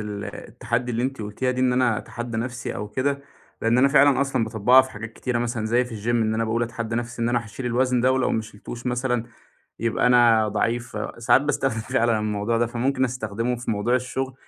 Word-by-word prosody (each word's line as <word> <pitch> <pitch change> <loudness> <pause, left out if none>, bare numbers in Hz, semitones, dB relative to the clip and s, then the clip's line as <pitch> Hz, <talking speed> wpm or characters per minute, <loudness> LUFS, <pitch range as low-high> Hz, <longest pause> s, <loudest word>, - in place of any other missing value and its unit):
ال 105 -1 -5
التحدّي 125 +1 -4
اللي 115 - -1
أنت 130 -3 -2
قلتيها 105 +5 -2
دي 125 0 -2
إن 125 -1 +3
أنا 125 -4 +2
أتحدى 120 -1 -6
نَفسي 120 +1 -4
أو 105 - -5
كده، 140 +5 -1 0.4
لأن 115 +2 +3
أنا 135 +2 +5
فعلًا 140 -1 +5
أصلًا 135 -4 +1
باطبقها 115 +4 +5
في 130 - -9
حاجات 110 0 -8
كتيرة 125 0 -2
مثلًا 120 -2 -2
زي 120 +3 +2
في 115 -4 -8
الgym - - -2
إن 110 -2 +2
أنا 115 +1 0
باقول 115 +2 0
أتحدى 115 -1 -3
نَفسي 120 0 -4
إن 115 - +1
أنا 120 -1 0
هاشيل 115 +4 -7
الوزن 125 +1 +1
ده 130 +2 +3
ولو 130 -1 +1
ما 110 - 0
شلتوش 110 +3 -9
مثلًا 125 -1 0 0.5
يبقى 115 +1 +1
أنا 115 -3 +5
ضعيف، 120 +1 -1 0.2
ساعات 115 - +4
باستخدم 135 -5 -1
فعلًا 115 -2 +1
الموضوع 105 +2 -1
ده. 120 - +2
فممكن 130 +3 0
أستخدمه 115 0 -2
في 120 - -4
موضوع 110 +4 0
الشغل 130 +1 -2
120 Hz, 210 wpm, -24 LUFS, 110-125 Hz, 0.5 s, أنا